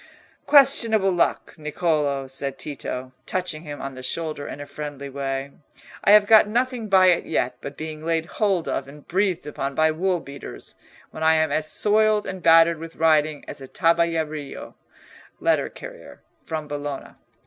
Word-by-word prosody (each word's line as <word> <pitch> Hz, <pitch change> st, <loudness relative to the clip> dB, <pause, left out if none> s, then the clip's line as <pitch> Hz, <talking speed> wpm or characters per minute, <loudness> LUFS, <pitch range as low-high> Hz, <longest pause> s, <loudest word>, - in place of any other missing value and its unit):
"Questionable 230 Hz, -8 st, +5 dB
luck, 175 Hz, -2 st, 0 dB
Niccolò," 150 Hz, -3 st, -1 dB
said 135 Hz, +1 st, -3 dB
Tito, 130 Hz, -3 st, -6 dB, 0.2 s
touching 180 Hz, -4 st, -2 dB
him 145 Hz, -3 st, -8 dB
on 135 Hz, 0 st, -6 dB
the 130 Hz, -, -9 dB
shoulder 150 Hz, +2 st, -3 dB
in -, -, -7 dB
a 145 Hz, -, -6 dB
friendly 145 Hz, -2 st, -7 dB
way; 135 Hz, 0 st, -4 dB, 0.5 s
"I -, -, +2 dB
have 210 Hz, -1 st, +7 dB
got 215 Hz, 0 st, +6 dB
nothing 240 Hz, 0 st, -1 dB
by 190 Hz, -1 st, +6 dB
it 175 Hz, -, 0 dB
yet 125 Hz, 0 st, -1 dB
but 140 Hz, -, -8 dB
being 155 Hz, 0 st, -7 dB
laid 165 Hz, 0 st, 0 dB
hold 195 Hz, -3 st, -1 dB
of 135 Hz, -, -2 dB
and 145 Hz, +1 st, -14 dB
breathed 185 Hz, -2 st, 0 dB
upon 140 Hz, -2 st, -4 dB
by 155 Hz, +1 st, +3 dB
wool 180 Hz, +3 st, 0 dB
beaters, 140 Hz, -, -10 dB, 0.4 s
when -, -, -9 dB
I 160 Hz, 0 st, +4 dB
am 160 Hz, 0 st, +1 dB
as 155 Hz, 0 st, -1 dB
soiled 215 Hz, 0 st, +2 dB
and 190 Hz, -1 st, -6 dB
battered 165 Hz, 0 st, +5 dB
with 165 Hz, 0 st, -9 dB
riding 155 Hz, -2 st, +2 dB
as -, -, -7 dB
a 135 Hz, -, -8 dB
tabellario 165 Hz, -4 st, -1 dB, 0.7 s
(letter -, -, +1 dB
carrier) -, -, -12 dB, 0.2 s
from 155 Hz, -2 st, -4 dB
Bologna." 145 Hz, -1 st, -5 dB
160 Hz, 165 wpm, -23 LUFS, 145-185 Hz, 0.7 s, have